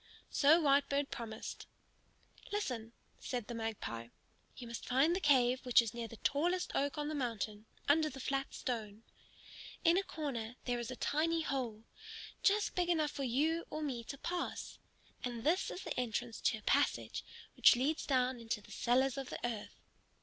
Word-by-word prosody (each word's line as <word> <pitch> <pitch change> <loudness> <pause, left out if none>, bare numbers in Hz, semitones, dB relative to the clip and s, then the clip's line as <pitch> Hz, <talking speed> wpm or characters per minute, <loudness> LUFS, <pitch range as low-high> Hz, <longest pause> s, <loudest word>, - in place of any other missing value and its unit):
So 305 +4 +6
Whitebird 280 -1 +2
promised. 225 -2 -6 0.8
"Listen," 250 - -2 0.3
said 245 -4 -3
the 240 - -6
Magpie. 220 - -4 0.5
"You 245 - -7
must 235 0 -6
find 275 +7 +4
the - - 0
cave 255 -6 +4
which 250 -2 +6
is 230 -2 +1
near 235 -1 -4
the 230 - -11
tallest 350 +9 +1
oak 285 +2 0
on 295 0 -1
the 310 - -2
mountain, 225 -5 -3 0.2
under 310 +2 +4
the 270 - -9
flat 270 +1 -1
stone. 220 -3 -4 0.8
In 340 +1 +5
a - - -1
corner 250 - -4
there 245 -1 0
is 240 - -4
a 255 - -4
tiny 325 +5 +1
hole, 245 -8 -2 0.6
just 415 +1 +3
big 355 -1 +1
enough 310 -4 +2
for 280 - -4
you 305 +7 +1
or 310 - -4
me 250 -5 -2
to 280 - -6
pass. 350 +4 -4 0.4
And 240 -3 -3
this 340 +7 +2
is 365 - -6
the - - -3
entrance 240 -1 -2
to - - +3
a 215 - -14
passage - - +1 0.3
which - - +8
leads 280 +6 0
down 255 -2 +2
into 230 -1 -2
the 210 - -16
cellars 260 +2 +2
of 270 - -5
the - - -4
earth. 225 -4 -5
260 Hz, 175 wpm, -35 LUFS, 235-300 Hz, 0.8 s, which